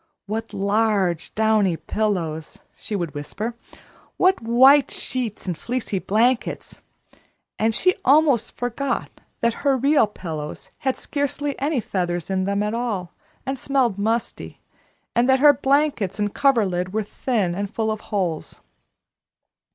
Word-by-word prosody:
"What 225 +2 -4
large, 200 -4 0
downy 215 -5 +2
pillows!" 170 -9 -2 0.2
she 210 - -5
would 170 -5 -3
whisper. 200 +11 -5 0.6
"What 370 -4 +3
white 260 +5 +6
sheets 245 -5 -1
and 180 -3 -2
fleecy 235 -1 -3
blankets!" 230 +6 0 0.8
And 220 0 +2
she 365 +7 +4
almost 275 -5 +3
forgot 245 +3 -2 0.3
that 235 0 +2
her 275 -2 +2
real 275 -2 +3
pillows 160 -7 -7
had 265 -1 -1
scarcely 285 0 -2
any 280 0 0
feathers 175 -4 -2
in 190 -1 0
them 200 +1 0
at 210 +1 -2
all, 215 -7 -3 0.3
and 270 -1 -3
smelled 250 -7 +1
musty, 225 +3 -2 0.6
and 240 +2 +3
that 265 0 +5
her 290 +1 +7
blankets 275 -6 +1
and 205 -1 -1
coverlid 195 -9 +1
were 220 0 0
thin 205 -4 -1
and 200 +2 -4
full 220 -1 -1
of 215 0 -4
holes. 180 -7 -2
220 Hz, 135 wpm, -22 LUFS, 195-260 Hz, 0.8 s, her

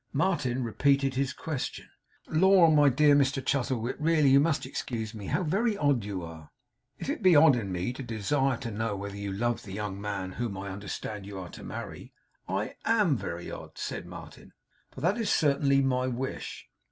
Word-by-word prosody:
Martin 135 -6 0
repeated 135 +3 +2
his 135 0 0
question. 145 -1 -5 0.4
'Lor, 180 0 +5
my 145 -1 +6
dear 145 +3 +4
Mr 140 -1 +3
Chuzzlewit! 130 -3 -1
really 155 -3 +3
you 135 - +7
must 155 +1 +1
excuse 110 -2 -4
me! 105 -3 -7
How 185 - 0
very 205 +6 +1
odd 145 - +2
you 100 -3 -4
are.' 80 -2 -10 0.5
'If - - -6
it 290 0 -2
be 185 -4 +6
odd 145 -2 +7
in 100 -6 -3
me 90 +7 -2
to 130 - -7
desire 130 +3 0
to 120 -2 -5
know 110 0 -2
whether 100 0 -6
you 100 -1 -4
love 120 +4 -1
the 95 - -9
young 100 -1 -4
man 100 -3 -3
whom 110 -1 -4
I 95 0 -5
understand 100 +1 -6
you 100 -1 -7
are 90 -2 -7
to - - -11
marry, - - -7 0.4
I 95 +3 -2
AM 210 -10 +3
very 85 -7 -5
odd,' - - -9
said - - -5
Martin. - - -11 0.4
'For 130 - -11
that 185 - +1
is 225 - -1
certainly 140 -2 +3
my 130 -1 +1
wish. 130 +1 -5
130 Hz, 190 wpm, -28 LUFS, 105-145 Hz, 0.5 s, you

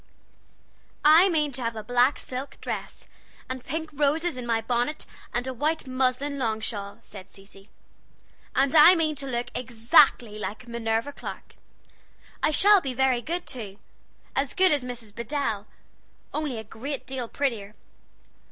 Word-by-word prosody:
"I 325 +6 +7
mean 305 -4 +1
to 260 0 -6
have 230 -1 -2
a 215 - -6
black 245 +5 +3
silk 260 +2 -6
dress, - - -6 0.4
and 260 -1 -5
pink 320 +2 -4
roses 300 +3 +1
in 250 -1 -6
my 230 -1 +2
bonnet, 245 +6 -1 0.3
and 245 +1 -1
a 260 - -3
white 305 +6 -1
muslin 260 +2 0
long 220 -3 0
shawl," 200 -3 -5
said 195 -3 -11
Cecy; 195 0 -17 0.9
"and 275 +2 +2
I 320 +4 +9
mean 315 -2 +1
to 275 0 -5
look 245 -1 -3
exactly 235 -2 +3
like 210 +5 -6
Minerva 230 +2 -1
Clark! - - -9 0.9
I - - +3
shall 400 +6 +6
be 265 -4 -4
very 260 -1 +2
good, 345 +6 -3
too; 210 -6 -6 0.6
as 275 -1 -1
good 375 0 +5
as 290 -3 +2
Mrs. 240 -4 -8
Bedell, 235 -3 -3 0.7
only 300 -6 -2
a 220 - -5
great 260 +7 -6
deal 260 -3 -4
prettier. 225 -7 -2
255 Hz, 150 wpm, -26 LUFS, 225-290 Hz, 0.9 s, I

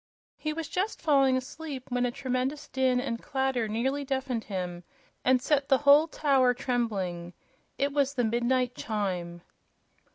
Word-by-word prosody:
He 305 - -3
was 315 0 -4
just 385 +7 -2
falling 275 -4 +3
asleep 270 +1 -6
when 245 0 +1
a - - -2
tremendous 265 +3 -2
din 260 -1 +1
and 240 -3 -3
clatter 265 -4 -1
nearly 260 +7 -1
deafened 265 -4 -2
him, 180 -3 -4 0.4
and 255 0 +4
set 280 +1 +1
the 270 - +6
whole 290 +3 +6
tower 270 -5 +2
trembling. 195 -9 -2 0.4
It 280 +1 0
was 280 -1 +1
the 245 - +1
midnight 240 +2 +1
chime. 180 -7 -3
255 Hz, 150 wpm, -28 LUFS, 230-280 Hz, 0.4 s, the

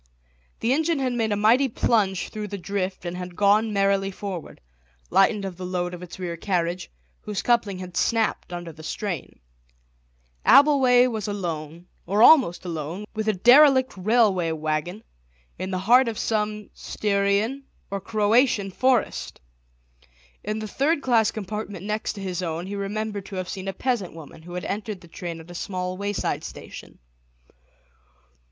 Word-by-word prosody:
The 230 +3 +2
engine 320 +2 +1
had 260 -2 -1
made 225 -2 0
a - - +2
mighty 230 +7 +4
plunge 205 -5 +1
through 215 -1 -5
the 200 0 -5
drift 185 0 -3
and 175 0 -4
had 180 -1 -7
gone 210 +3 +3
merrily 195 -1 +2
forward, 190 -3 -7 0.5
lightened 200 +1 +3
of 185 -3 -6
the 185 - -7
load 180 -1 -2
of 175 - -8
its 180 -1 -9
rear 175 -2 -4
carriage, 175 0 -2 0.3
whose 210 -2 -4
coupling 230 -5 +1
had 180 -1 -8
snapped 225 -5 0
under 175 -1 -6
the 160 0 -13
strain. 180 +1 -5 1.0
Abbleway 260 -2 +6
was 220 -5 -2
alone, 170 -4 -5 0.2
or 205 +5 +3
almost 250 - +6
alone, 165 +4 -5
with 220 -1 -3
a 215 - +3
derelict 260 +6 +6
railway 195 -4 +2
waggon, 155 +6 -3 0.6
in 185 +1 -3
the 185 - -2
heart 240 +7 +5
of 225 -2 -3
some 210 -1 -2
Styrian 205 +6 0 0.3
or 200 -1 -3
Croatian 210 0 +2
forest. 255 +4 0 1.0
In 215 +1 -2
the 215 0 -4
third 285 +7 0
class 230 -4 +3
compartment 205 -2 -6
next 215 +1 -2
to 200 - -8
his 185 -2 -3
own 170 0 -3
he 200 +2 -5
remembered 205 0 -4
to 200 - -8
have 185 -1 -3
seen 190 0 -6
a - - 0
peasant 225 -6 -2
woman, 160 -1 -11
who 175 +2 -11
had 180 - -4
entered 205 -1 -4
the 170 - -14
train 170 0 -6
at 165 +2 -12
a - - -8
small 185 0 -4
wayside 200 +1 -2
station. - - -10
200 Hz, 160 wpm, -24 LUFS, 180-220 Hz, 1.0 s, Abbleway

